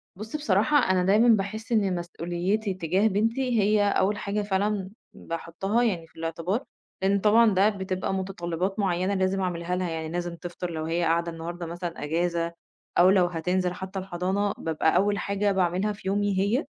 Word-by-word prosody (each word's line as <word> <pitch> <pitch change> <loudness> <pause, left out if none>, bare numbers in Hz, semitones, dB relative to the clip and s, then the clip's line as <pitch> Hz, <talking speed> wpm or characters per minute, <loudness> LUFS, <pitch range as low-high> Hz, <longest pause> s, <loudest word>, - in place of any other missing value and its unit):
بُصّ 215 +8 -7
بصراحة، 290 +1 +2
أنا 180 -1 +2
دايمًا 210 +6 +4
باحس 220 +1 +1
إن 200 -5 +2
مسؤوليتي 175 +4 -2
تجاه 185 +4 +1
بنتي 230 +4 +1
هي 205 +1 +3
أول 200 0 +2
حاجة 205 +1 -2
فعلًا 200 -1 -1 0.2
باحُطّها 175 +7 -2
يعني 175 -8 -1
في - - -30
الاعتبار، 165 - -2 0.4
لإن 195 +1 +2
طبعًا 215 +1 +5
ده 195 +3 +4
بتبقى 190 -2 -3
متطلّبات 190 0 -3
معيّنة 185 0 +1
لازم 190 0 0
اعملها 180 -1 -2
لها، 180 -1 -1
يعني 160 -1 -4
لازم 175 0 -3
تفطَر 175 0 -6
لو 160 -1 -3
هي 170 +2 0
قاعدة 170 +1 +1
النهاردة 170 +1 -6
مثلًا 170 0 -5
أجازة 170 +2 -1 0.4
أو 180 +2 +7
لو 190 -2 +5
هتنزِل 180 +1 -1
حتى 190 +1 -6
الحضانة 190 +2 -1
بابقى 160 0 0
أول 200 +2 +3
حاجة 200 0 0
باعملها 190 +2 +1
في 195 - -10
يومي 200 -1 +1
هي، 215 - +1
190 Hz, 170 wpm, -26 LUFS, 175-205 Hz, 0.4 s, أو